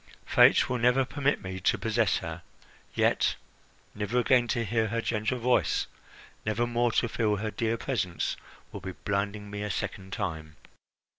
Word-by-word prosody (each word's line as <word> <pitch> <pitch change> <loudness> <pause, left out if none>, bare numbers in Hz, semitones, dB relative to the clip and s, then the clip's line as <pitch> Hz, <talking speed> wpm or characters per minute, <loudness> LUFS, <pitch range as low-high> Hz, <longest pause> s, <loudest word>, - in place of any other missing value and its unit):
Fate - - +6
will 125 -1 -1
never 125 +3 +3
permit 145 -2 0
me 95 0 -5
to 90 - +2
possess 110 -2 +1
her; - - -6 0.5
yet - - +2 0.6
never 105 +3 -2
again 125 0 +4
to 120 -1 0
hear 110 +1 +1
her 115 +2 -1
gentle 115 +2 -1
voice, 125 +1 +2 0.6
never 110 +2 0
more 120 0 +1
to 120 - +2
feel 110 -2 +1
her 105 +1 -3
dear 115 +1 -1
presence, 100 -10 -2 0.4
would 100 - -7
be 95 +1 -6
blinding 100 +1 -3
me 105 0 -5
a 105 - -3
second 95 -1 -4
time." 80 -4 -4
110 Hz, 160 wpm, -28 LUFS, 100-120 Hz, 0.6 s, Fate